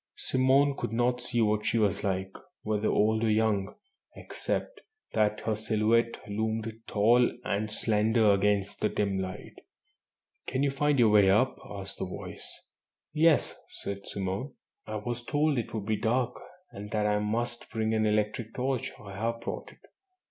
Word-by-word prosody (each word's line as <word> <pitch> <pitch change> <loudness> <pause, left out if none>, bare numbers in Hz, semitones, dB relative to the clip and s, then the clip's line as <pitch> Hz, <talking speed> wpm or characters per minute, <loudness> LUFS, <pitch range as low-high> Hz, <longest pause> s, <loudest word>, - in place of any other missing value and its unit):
Simone 135 +2 +3
could - - -4
not 120 +2 +1
see 120 -1 +1
what 105 0 +1
she 115 - +1
was 105 -3 +1
like, 95 -1 -1 0.3
whether 110 0 0
old 110 +1 +2
or 115 - +2
young, 105 -2 +1 0.4
except - - -4 0.3
that 105 -1 +1
her 110 - 0
silhouette 110 +2 +1
loomed 110 +1 -2
tall 120 +4 +4
and 105 -1 -1
slender 110 0 +3
against 100 0 +1
the 105 - +1
dim 100 -2 -1
light. 95 -1 -6 0.9
"Can 130 +2 0
you 140 - +2
find 145 +1 +1
your 120 -3 +5
way 100 -2 +6
up?" 110 +7 +3
asked 100 -1 -5
the - - -1
voice. 90 - -7 0.5
"Yes," 160 0 +3 0.2
said 100 0 -5
Simone, 100 +7 -3 0.3
"I 110 - -4
was 120 +3 -3
told 145 +1 +1
it 115 - -4
would 110 -3 -4
be 110 0 0
dark, 125 +3 +1 0.4
and 105 +1 -8
that 105 0 0
I 105 0 +2
must 120 +3 -2
bring 110 0 -1
an 110 -1 +2
electric 105 +2 -1
torch. 130 0 -1
I 100 -2 -10
have 115 +3 -2
brought - - -5
it." - - -22
110 Hz, 165 wpm, -29 LUFS, 105-120 Hz, 0.9 s, way